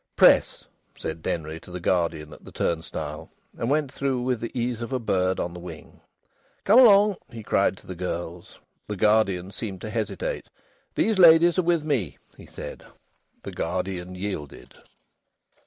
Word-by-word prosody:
"Press," - - +5 0.3
said 80 0 -5
Denry 80 0 -3
to 85 - -15
the 90 0 -6
guardian 85 -4 -1
at - - -15
the - - -12
turnstile, 80 -2 -3 0.3
and 115 - -2
went 145 -2 +1
through 135 -3 -1
with 125 -2 0
the 115 - -3
ease 120 -1 -2
of 115 - -5
a 130 - +1
bird 95 -5 0
on 85 - -3
the 90 - -8
wing. 85 -3 -11 0.6
"Come 215 +6 +6
along," 210 -4 +7
he 115 -3 -9
cried 100 -1 +1
to - - -18
the 95 - -6
girls. 85 0 -5 0.3
The 105 - -3
guardian 100 -3 +2
seemed 100 -2 -6
to 110 - -6
hesitate. 105 -3 -3 0.5
"These 215 -2 +1
ladies 170 +1 +7
are - - +5
with 170 -2 +1
me," 130 - -1 0.2
he - - -14
said. - - -8 0.6
The - - -6
guardian 90 +1 -3
yielded. 90 -7 -6
100 Hz, 165 wpm, -25 LUFS, 90-130 Hz, 0.6 s, along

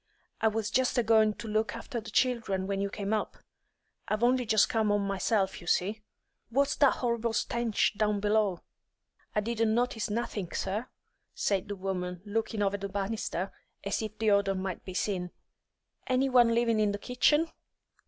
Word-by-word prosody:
I 225 - +4
was 220 -1 -1
just 255 0 +2
a 245 - +4
goin' 220 -1 +4
to 230 - -8
look 215 +1 0
after 230 0 -5
the 220 - -9
children 230 -7 +1
when 195 0 -2
you 200 - -1
came 205 +1 -3
up. 215 - -2 0.7
I've 215 +2 -1
only 250 0 +3
just 215 -2 +4
come 220 -2 +1
'ome 205 -1 +1
myself, 195 0 0
you 175 - -12
see." 205 +5 +1 0.5
"What's 280 +4 +2
that 280 -2 +5
horrible 235 -2 -1
stench 230 -1 0
down 210 0 +1
below?" 205 -3 +1 0.7
"I 210 - +3
didn't 225 0 0
notice 240 -3 0
nothink, 210 -4 -3
sir," 210 +6 -2 0.5
said 200 0 0
the 205 - -4
woman, 180 -2 -4
looking 215 0 -1
over 200 0 +1
the 200 0 -5
banisters 195 -2 -2 0.3
as 200 +2 -1
if 215 -1 -5
the 215 -1 +2
odour 200 -1 +3
might 185 -1 -4
be 185 - -8
seen. 180 -3 -1 0.8
"Any 260 +1 +2
one 240 -2 +5
living 230 -2 +2
in 210 -1 +2
the - - -2
kitchen?" 295 +9 +2
215 Hz, 175 wpm, -29 LUFS, 200-230 Hz, 0.8 s, that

